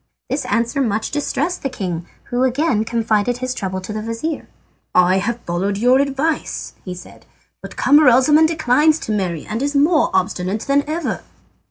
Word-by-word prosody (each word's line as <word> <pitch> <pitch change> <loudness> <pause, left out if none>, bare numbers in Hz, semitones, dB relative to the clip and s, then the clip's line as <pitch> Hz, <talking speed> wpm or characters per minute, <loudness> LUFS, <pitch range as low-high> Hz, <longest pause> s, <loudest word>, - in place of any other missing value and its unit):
This - - -1
answer 235 +4 0
much 220 -3 -1
distressed 295 +4 -2
the 270 - -2
king, 180 -8 -4 0.2
who 245 +1 0
again 260 -3 +1
confided 225 0 0
his 255 0 -3
trouble 190 -6 -3
to 200 +3 -6
his 215 0 -4
vizir. 230 +8 -4 0.5
"I 180 +1 +5
have 235 +4 -3
followed 190 +4 -2
your 250 +5 +4
advice," 280 +3 -2
he 180 -2 -6
said; 180 - -13 0.3
"but - - -9
Camaralzaman 295 +2 +5
declines 310 -1 +3
to - - -4
marry, 180 -6 -2
and 220 +3 -4
is 285 +1 -1
more 300 +3 +3
obstinate 190 +2 -1
than 280 +2 +1
ever." 330 +2 -2
245 Hz, 165 wpm, -19 LUFS, 205-285 Hz, 0.5 s, I